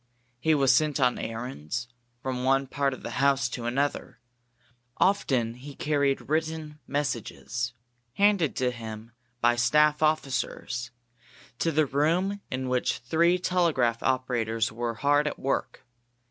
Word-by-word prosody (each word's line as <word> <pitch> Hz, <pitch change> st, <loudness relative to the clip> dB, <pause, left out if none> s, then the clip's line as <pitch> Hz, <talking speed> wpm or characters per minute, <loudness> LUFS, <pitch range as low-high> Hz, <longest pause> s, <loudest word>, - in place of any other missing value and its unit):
He 160 Hz, +4 st, +3 dB
was 135 Hz, -3 st, +4 dB
sent 150 Hz, +2 st, +2 dB
on 125 Hz, -2 st, +2 dB
errands, 115 Hz, -, -4 dB, 0.4 s
from 130 Hz, -1 st, -2 dB
one 135 Hz, +1 st, +3 dB
part 140 Hz, 0 st, -1 dB
of -, -, -15 dB
the -, -, -5 dB
house 135 Hz, -3 st, +3 dB
to 120 Hz, -1 st, -5 dB
another; 140 Hz, +4 st, -1 dB, 0.8 s
often 130 Hz, -, +2 dB
he 135 Hz, +4 st, -11 dB
carried 140 Hz, -2 st, 0 dB
written 155 Hz, 0 st, -2 dB
messages, 125 Hz, -3 st, -3 dB, 0.4 s
handed 200 Hz, -5 st, +3 dB
to 125 Hz, -1 st, +1 dB
him 115 Hz, -1 st, -8 dB, 0.3 s
by 120 Hz, 0 st, +4 dB
staff 150 Hz, +6 st, +3 dB
officers, 140 Hz, -5 st, -1 dB, 0.7 s
to 165 Hz, -, +1 dB
the 155 Hz, 0 st, +3 dB
room 170 Hz, +9 st, +1 dB
in 130 Hz, 0 st, -3 dB
which 125 Hz, -1 st, 0 dB
three 165 Hz, +8 st, +2 dB
telegraph 165 Hz, -11 st, +1 dB
operators 120 Hz, -4 st, 0 dB
were 115 Hz, 0 st, -3 dB
hard 145 Hz, +4 st, +2 dB
at -, -, -3 dB
work. 135 Hz, -1 st, -2 dB
135 Hz, 130 wpm, -27 LUFS, 120-150 Hz, 0.8 s, was